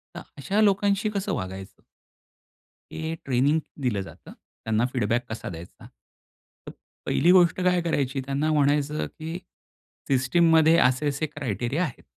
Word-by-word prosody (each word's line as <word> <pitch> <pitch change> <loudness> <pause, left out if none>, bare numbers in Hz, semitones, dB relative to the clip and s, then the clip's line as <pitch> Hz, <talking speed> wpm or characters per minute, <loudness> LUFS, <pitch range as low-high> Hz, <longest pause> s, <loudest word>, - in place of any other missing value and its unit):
तर - - -6 0.2
अशा 200 +10 0
लोकांशी 200 0 +2
कसं 195 0 -2
वागायचं? 95 +1 -7 1.1
हे 160 +1 -4
ट्रेनिंग 140 +4 +2 0.2
दिलं 115 -6 0
जातं. 95 - -12
त्यांना 110 +1 -3
फीडबॅक 120 0 0
कसा 110 -2 -6
द्यायचा? 85 0 -11
तर - - -19 0.3
पहिली 175 - +3
गोष्ट 180 0 +4
काय 180 -1 +2
करायची 140 -5 -1
त्यांना 140 +3 -1
म्हणायचं 150 0 +1
की 160 +2 -7 0.7
सिस्टममध्ये 160 +4 +4
असे 130 +4 +2
असे 140 +3 -2
क्रायटेरिया 130 - -3
आहेत. 160 - -6
145 Hz, 130 wpm, -25 LUFS, 125-170 Hz, 1.1 s, गोष्ट